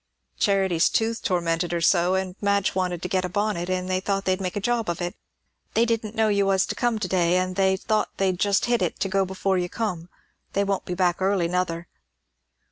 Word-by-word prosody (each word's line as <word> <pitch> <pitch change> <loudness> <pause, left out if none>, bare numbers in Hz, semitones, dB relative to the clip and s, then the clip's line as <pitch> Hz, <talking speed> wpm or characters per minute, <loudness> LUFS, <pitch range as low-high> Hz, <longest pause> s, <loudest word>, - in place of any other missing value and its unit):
"Charity's 190 -4 +3
tooth 225 0 0
tormented 170 -1 0
her 170 - 0
so, 175 +2 +3
and 190 -1 -2
Madge 200 -1 +1
wanted 180 -2 -2
to - - -1
get 185 0 0
a 180 - -2
bonnet; 205 -2 -1
and 185 0 -1
they 185 0 0
thought 195 0 -2
they'd 185 +1 +1
make 180 -2 -3
one 205 - -3
job 235 -4 0
of 170 - -2
it. 175 0 -3 0.6
They 230 - +4
didn't 225 -2 -2
know 220 -1 +3
you 200 -2 +2
was 190 -1 +3
comin' 240 -3 -1
to - - -1
day, 180 -1 +2
and 185 0 -1
they 190 0 +2
thought 215 +2 0
they'd 190 -2 0
just 200 0 +2
hit 240 -3 +1
it 180 - -1
to - - 0
go 195 0 +1
before 190 0 0
you 175 0 -2
come. 180 -7 -3 0.4
They 200 - +2
won't 195 -1 -1
be 180 - -3
back 180 -1 +1
early, 190 -2 +2
nother." 175 -1 -2
190 Hz, 220 wpm, -24 LUFS, 180-200 Hz, 0.6 s, They